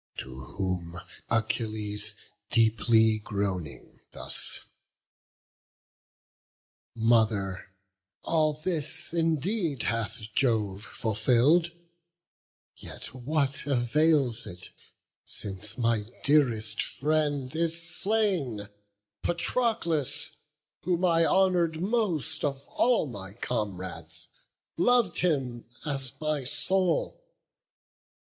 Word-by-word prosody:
To 65 0 -6 0.2
whom 90 -3 -2 0.3
Achilles, 110 -2 -1 0.3
deeply 110 -1 +4
groaning, 100 -7 -3
thus: - - -4 2.3
"Mother, 110 -5 +2 0.5
all 155 -2 +2
this 155 0 -2
indeed 165 - 0
hath 110 -1 -2
Jove 105 -6 +1
fulfill'd; 125 - +3 1.0
Yet - - -6
what 140 +2 -1
avails 135 -1 +2
it, 90 0 -8 0.5
since 100 0 -4
my 115 -3 +1 0.2
dearest 115 -7 +3
friend 145 -2 0
Is 165 0 +1
slain, 170 - 0 0.5
Patroclus? 170 - 0 0.5
whom 180 +1 +1
I 165 -1 +4
honour'd 180 -4 +3
most 175 - 0
Of 140 -1 -1
all 245 -7 +3
my 100 -7 -7
comrades, 95 -8 -4 0.5
lov'd 240 -2 +3
him 135 -9 0 0.2
as 135 -4 -1
my 155 -2 0
soul. 175 +6 0
130 Hz, 80 wpm, -28 LUFS, 110-165 Hz, 2.3 s, deeply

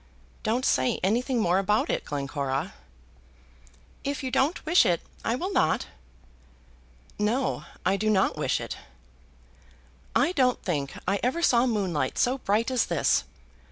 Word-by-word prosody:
Don't 240 +4 0
say 130 0 +2
anything 240 +6 +1
more 180 -3 +3
about 210 +2 +1
it, - - -1
Glencora." 140 +2 -3 1.3
"If 285 0 -3
you 260 - -3
don't 290 +8 +1
wish 340 +3 +5
it, 170 -1 +1 0.2
I 230 - 0
will 370 +9 -3
not." 160 - +2 1.3
"No; 235 +6 0 0.2
I 195 +2 +3
do 215 +2 0
not 195 -3 +2
wish - - 0
it. - - -6 1.4
I - - +3
don't 255 -8 +2
think 145 -6 -2
I 195 +1 +1
ever 265 +8 0
saw 245 -4 +4
moonlight 195 -9 -1
so 255 +2 +2
bright 220 +3 0
as 255 -2 +1
this. - - +2
215 Hz, 140 wpm, -27 LUFS, 180-255 Hz, 1.4 s, wish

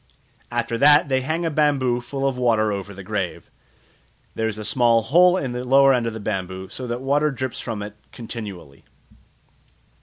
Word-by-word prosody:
After 115 0 -2
that 145 0 +6
they 130 -1 +1
hang 160 +6 -2
a 165 - 0
bamboo 140 -5 +1
full 135 +3 -3
of 135 - -1
water 110 -4 +1
over 100 0 -5
the 100 0 -10
grave; 95 -2 -4 0.8
there 110 - -1
is 105 -1 -4
a 105 - -6
small 115 -2 +3
hole 180 +9 +5
in 135 -8 -3
the 125 0 -4
lower 135 +1 +5
end 120 -2 0
of 115 - -3
the 110 - -6
bamboo, 95 -2 -4
so 130 - -7
that 120 - -2
the 125 - -8
water 145 +2 +2
drips 130 -2 -4
from 110 -4 -5
it 105 0 -8 0.2
continually. 100 - -9
120 Hz, 190 wpm, -22 LUFS, 105-135 Hz, 0.8 s, that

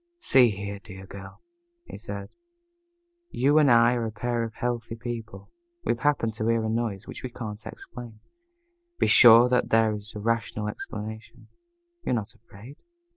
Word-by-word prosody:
"See 130 - +5
here, 100 0 -5
dear 95 -3 -11
girl," 95 - -12 0.4
he - - -10
said, 100 -1 -7 1.0
"you 145 - +3
and 145 -3 +4
I 120 0 +5
are 120 -2 -1
a - - -5
pair 120 +1 -2
of 115 -1 -5
healthy 120 -2 -3
people. 115 -1 -7 0.3
We - - +2
have 120 - -2
happened 115 -5 +1
to 110 - -2
hear 115 -1 +2
a - - -1
noise 110 -3 -2
which - - -9
we 130 - -5
can't 110 -3 -7
explain. 120 -3 -10 0.8
Be - - +2
sure 120 0 +8
that 125 0 +1
there 110 -1 +3
is 105 +1 -9
rational 110 0 -2
explanation. 110 +2 -8 0.5
You're 125 - -1
not 110 -3 -4
afraid?" 115 +6 -15
115 Hz, 165 wpm, -26 LUFS, 105-120 Hz, 1.0 s, sure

